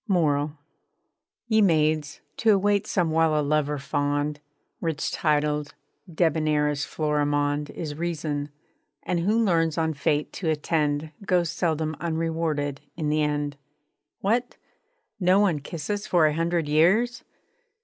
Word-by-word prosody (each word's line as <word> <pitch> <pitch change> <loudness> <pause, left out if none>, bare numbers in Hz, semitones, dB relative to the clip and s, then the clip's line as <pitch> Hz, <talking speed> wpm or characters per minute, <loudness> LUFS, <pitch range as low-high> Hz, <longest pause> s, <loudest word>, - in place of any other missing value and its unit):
MORAL 150 -6 +1 0.9
Ye 220 -2 +3
Maids, 155 -5 +2 0.2
to 225 - +2
await 205 +1 +1
some 175 -5 +1
while 160 -1 +3
a - - +1
lover 150 0 +1
fond, 145 +1 -1 0.4
Rich 165 -3 -2
titled, 150 -1 0 0.4
debonair 155 -2 +2
as 145 -1 -2
Florimond, 145 -1 0
Is 155 -3 -5
reason; 150 -3 -3 0.5
and 180 - -1
who 205 +6 +1
learns 165 -4 +1
on 160 -1 +1
fate 145 +1 -1
to 170 - -2
attend 150 -1 0
_Goes 180 -4 +1
seldom 160 -2 -1
unrewarded 160 -3 -2 0.2
in 155 -3 -1
the 155 +1 +2
end 145 -1 -1 0.7
_ - - -2
_'What! 240 +4 +1 0.7
No 185 +1 +4
one 185 -7 +2
kiss 150 +2 -7
us 205 -1 -2
for 170 -3 +4
a 150 - +3
hundred 165 0 0
years!' 190 +11 +3
155 Hz, 135 wpm, -25 LUFS, 150-170 Hz, 0.9 s, No